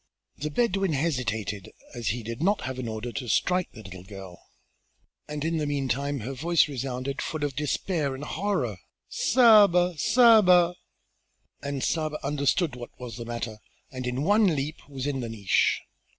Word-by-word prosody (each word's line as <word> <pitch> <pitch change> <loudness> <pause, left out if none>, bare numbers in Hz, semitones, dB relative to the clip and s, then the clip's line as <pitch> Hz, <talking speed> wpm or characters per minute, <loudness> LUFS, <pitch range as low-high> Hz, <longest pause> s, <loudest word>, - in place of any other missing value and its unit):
The 150 +2 -3
Bedouin 195 -1 +1
hesitated, 120 - -2 0.2
as 120 -3 -5
he 115 +4 -1
did 115 +4 -6
not 200 +4 +2
have 130 0 -5
an 125 - -4
order 110 +2 -4
to 125 0 -5
strike 180 - +1
the 110 - -11
little 95 -2 -10
girl, 95 -2 -11 0.8
and 150 0 -4
in 165 0 0
the 150 -2 -1
meantime 140 -1 -1
her 130 +6 -5
voice 165 +5 +2
resounded 135 0 -4
full 155 -2 -4
of 145 -3 -2
despair 150 0 -1
and 135 - -8
horror: 155 - -2 0.3
"Saba! 205 -8 +5
Saba!" 210 - +6 0.9
And 140 -1 -3
Saba 155 -2 -1
understood 140 +2 +1
what 120 -1 -10
was 125 -2 -7
the 120 - -6
matter 115 -2 -5 0.3
and 130 -2 -5
in 125 +3 -2
one 205 +4 +4
leap 145 +2 -3
was 135 -2 -5
in 145 -2 -1
the 120 -2 -4
niche. 105 -4 +1
140 Hz, 165 wpm, -26 LUFS, 120-170 Hz, 0.9 s, Saba